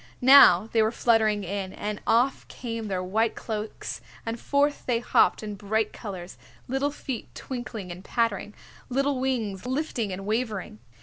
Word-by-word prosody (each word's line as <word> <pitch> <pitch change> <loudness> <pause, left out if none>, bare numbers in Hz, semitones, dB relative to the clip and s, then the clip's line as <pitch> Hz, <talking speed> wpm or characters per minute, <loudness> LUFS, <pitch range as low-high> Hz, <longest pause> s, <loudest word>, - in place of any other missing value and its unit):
Now 245 -8 +8
they 225 - +3
were 220 0 +2
fluttering 220 -3 +2
in, 190 0 -4
and 210 0 -4
off 245 +4 +2
came 230 -3 -5
their 185 -2 -2
white 220 +5 +1
cloaks 215 -1 -5 0.2
and 230 +1 -3
forth 285 +1 +1
they 245 -2 +2
hopped 235 -1 +3
in 210 -1 -4
bright 210 +2 -1
colors, 185 - -8 0.3
little 270 +3 0
feet 270 -4 -6
twinkling 235 -7 -6
and 180 +2 -9
pattering, 215 -2 -1 0.3
little 275 +1 +1
wings 240 -5 -2
lifting 255 -6 -2
and 190 +1 -5
wavering. 215 - -2
225 Hz, 150 wpm, -26 LUFS, 200-250 Hz, 0.3 s, Now